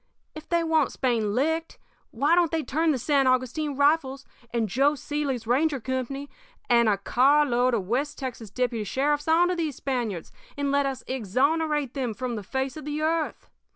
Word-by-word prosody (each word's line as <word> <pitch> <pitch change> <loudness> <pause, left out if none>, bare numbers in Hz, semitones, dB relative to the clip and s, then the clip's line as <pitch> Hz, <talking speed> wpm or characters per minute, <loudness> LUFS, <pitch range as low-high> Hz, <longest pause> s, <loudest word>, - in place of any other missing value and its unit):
If 310 0 -11
they 340 -1 +2
want 320 -3 +2
Spain 225 -5 0
licked, 320 +5 -1 0.3
why 285 +8 +1
don't 345 -1 +4
they 320 -1 -1
turn 320 +4 0
the 290 - +2
San 275 +1 +2
Augustine 255 +3 0
Rifles 280 -2 +2 0.3
and 230 -2 0
Joe 275 +8 +2
Seely's 280 -4 -3
ranger 275 +4 +1
company 260 +3 -4 0.4
and 235 -2 +4
a 205 - +2
car 275 +8 +3
load 250 -1 +2
of 195 -5 -3
West 275 +7 -1
Texas 245 -5 -6
deputy 240 0 -1
sheriffs 290 +7 0
onto 345 +3 +4
these 320 -6 -2
Spaniards, 235 - -3 0.3
and 285 -1 -1
let 280 0 +2
us 265 -2 -4
exonerate 275 - 0
them 250 -6 -3
from 250 0 -3
the 210 - -4
face 265 +6 -3
of 310 -2 -8
the 295 0 -3
earth? 320 0 -1
275 Hz, 180 wpm, -26 LUFS, 245-300 Hz, 0.4 s, don't